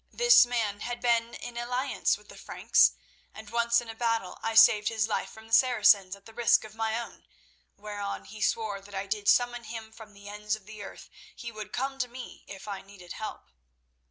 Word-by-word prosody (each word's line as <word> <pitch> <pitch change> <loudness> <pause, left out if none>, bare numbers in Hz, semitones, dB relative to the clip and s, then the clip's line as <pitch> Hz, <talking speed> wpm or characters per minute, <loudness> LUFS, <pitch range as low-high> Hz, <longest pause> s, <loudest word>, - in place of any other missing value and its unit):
This 485 - +6
man 220 -4 -1
had 240 +2 -4
been 235 -1 +1
in 240 -1 -8
alliance 250 +3 0
with - - -21
the - - -12
Franks, - - +3 0.4
and 220 -1 -11
once 235 0 +3
in 240 - -12
a 225 - -6
battle 230 -4 -2
I 225 0 -2
saved 215 -2 +7
his 220 -2 0
life 215 - -2
from 220 0 -14
the 225 - -13
Saracens 210 -6 +5
at 200 - -21
the 225 - -13
risk 235 -1 +3
of 215 -1 -11
my 225 +1 -1
own, 235 - -10 0.5
whereon 205 -1 -5
he 215 0 -11
swore 210 -3 -1
that 195 0 -6
did 210 -1 -2
I - - +4
summon 245 -1 +2
him 220 -1 -8
from 220 -1 -14
the 200 0 -14
ends 210 +1 -3
of 215 -3 -15
the 215 0 -10
earth 195 - -10 0.3
he 235 -2 -7
would 215 -2 -8
come 270 +2 -3
to 250 - 0
me 245 +1 -10
if 195 +1 -10
I 200 -2 -5
needed 195 -3 -12
help. 215 - -8
220 Hz, 215 wpm, -28 LUFS, 205-235 Hz, 0.5 s, saved